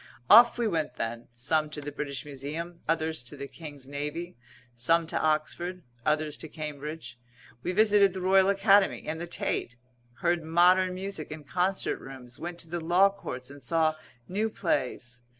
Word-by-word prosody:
Off 235 +3 +9
we 235 -2 +1
went 160 -9 -1
then, 115 +1 -4
some 150 +6 0
to 150 - -5
the 145 0 -6
British 140 -1 -4
Museum; 150 +5 -6
others 160 -3 0
to 125 +4 -8
the 140 0 -6
King's 145 -4 -10
Navy; 150 +5 -4 0.4
some 165 +8 +3
to 160 - -2
Oxford; 170 +4 -1 0.2
others 150 +1 0
to 160 - -7
Cambridge; 150 -4 -6 0.4
we 180 - -2
visited 205 -1 +5
the 190 - -5
Royal 190 +1 +5
Academy 200 0 +4
and 160 +1 -3
the 175 - -4
Tate; 125 -7 -2 0.5
heard 175 0 +2
modern 180 +3 +4
music 190 -4 -5
in 155 -1 -7
concert 180 +6 0
rooms, 130 -2 -10
went 175 0 -5
to - - -11
the 175 +1 -3
Law 180 +4 +5
Courts, 130 -10 -7
and 140 0 -12
saw 155 +5 +2 0.3
new 210 +4 0
plays. 125 - -2
160 Hz, 170 wpm, -28 LUFS, 145-180 Hz, 0.5 s, Off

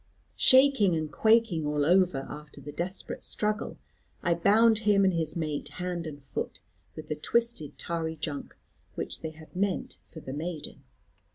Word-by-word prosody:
Shaking 260 -9 +6
and 155 -1 -2
quaking 220 -7 +3
all 150 -1 +1
over 175 -5 +3
after 150 -1 -9
the 145 +2 -8
desperate 175 +6 -4
struggle, 210 +1 -2 0.5
I 170 - +3
bound 215 +6 +5
him 205 -2 +4
and 190 - +3
his 160 -2 -1
mate, 155 -3 -3
hand 180 -1 -3
and 145 -2 -7
foot, 135 - -5 0.4
with 155 - -8
the 155 - -2
twisted 230 -1 -1
tarry 165 -2 -2
junk, 145 -3 -5 0.4
which - - -4
they 160 - -3
had 155 +2 -15
meant 190 0 -1
for 160 - -12
the 130 -3 -7
maiden. 160 +1 -5
170 Hz, 160 wpm, -29 LUFS, 155-200 Hz, 0.5 s, Shaking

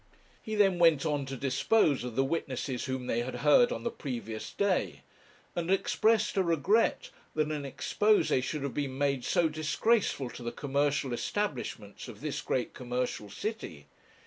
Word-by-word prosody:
He 220 - -4
then 195 -4 +3
went 165 -3 +5
on 145 -3 -1
to 135 0 -5
dispose 140 - +2
of 125 -2 -5
the 135 - +3
witnesses 135 -3 -2
whom 130 -1 -3
they 115 - 0
had 125 +2 -3
heard 240 +12 +6
on - - -4
the 235 - -1
previous 115 -6 -5
day, 200 -3 0 0.5
and 175 0 -2
expressed 215 +3 +2
a - - +5
regret 190 - +2 0.2
that 155 0 +1
an 150 -1 -2
exposé 210 -8 +2
should 140 +3 -3
have 140 -3 -3
been 140 -3 -3
made 140 -2 0
so 170 +6 +2
disgraceful 155 - 0
to 120 - -10
the 120 0 -3
commercial 140 -1 0
establishments 125 - -3
of - - -10
this - - -3
great 125 - -2
commercial 125 -4 -3
city. 100 - -5
145 Hz, 165 wpm, -30 LUFS, 130-185 Hz, 0.5 s, heard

